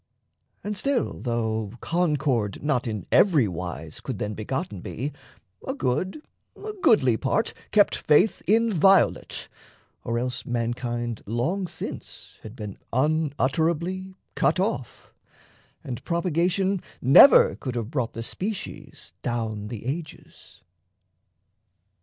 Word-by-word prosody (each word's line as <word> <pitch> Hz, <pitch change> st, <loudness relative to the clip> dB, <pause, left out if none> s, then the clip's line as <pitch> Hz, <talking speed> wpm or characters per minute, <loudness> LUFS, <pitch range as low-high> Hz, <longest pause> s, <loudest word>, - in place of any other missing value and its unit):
And 210 Hz, 0 st, -3 dB
still, 275 Hz, +3 st, 0 dB
Though 110 Hz, -3 st, -2 dB
concord 145 Hz, -, 0 dB
not 135 Hz, -5 st, +1 dB
in 105 Hz, -5 st, -4 dB
every 155 Hz, -, +5 dB
wise 85 Hz, -3 st, -6 dB
could -, -, -5 dB
then 105 Hz, +1 st, -3 dB
Begotten 130 Hz, -, -4 dB
be, 140 Hz, +10 st, -4 dB, 0.5 s
a 265 Hz, -, -2 dB
good, 185 Hz, -, -1 dB, 0.3 s
a 430 Hz, 0 st, -7 dB
goodly 130 Hz, -, +4 dB
part 215 Hz, -, 0 dB, 0.2 s
Kept 205 Hz, -1 st, +4 dB
faith 165 Hz, +8 st, +3 dB
inviolate 200 Hz, -4 st, +3 dB, 0.6 s
or 115 Hz, -, -1 dB
else 125 Hz, 0 st, -2 dB
mankind 120 Hz, -1 st, -2 dB
Long 160 Hz, -, -1 dB
since -, -, -8 dB
had 110 Hz, +1 st, -10 dB
been 105 Hz, -5 st, -7 dB
unutterably 160 Hz, +6 st, 0 dB, 0.2 s
cut -, -, +2 dB
off, 190 Hz, -, -3 dB, 0.7 s
And 120 Hz, -3 st, -6 dB
propagation 180 Hz, +3 st, 0 dB, 0.2 s
never 135 Hz, -, +8 dB
could 130 Hz, -3 st, -5 dB
have 115 Hz, 0 st, -3 dB
brought 125 Hz, -6 st, -1 dB
The 115 Hz, -, -5 dB
species 195 Hz, -, -6 dB
down 110 Hz, -3 st, -3 dB
the 110 Hz, 0 st, -7 dB
ages. 155 Hz, +4 st, -7 dB
135 Hz, 110 wpm, -25 LUFS, 115-185 Hz, 0.7 s, never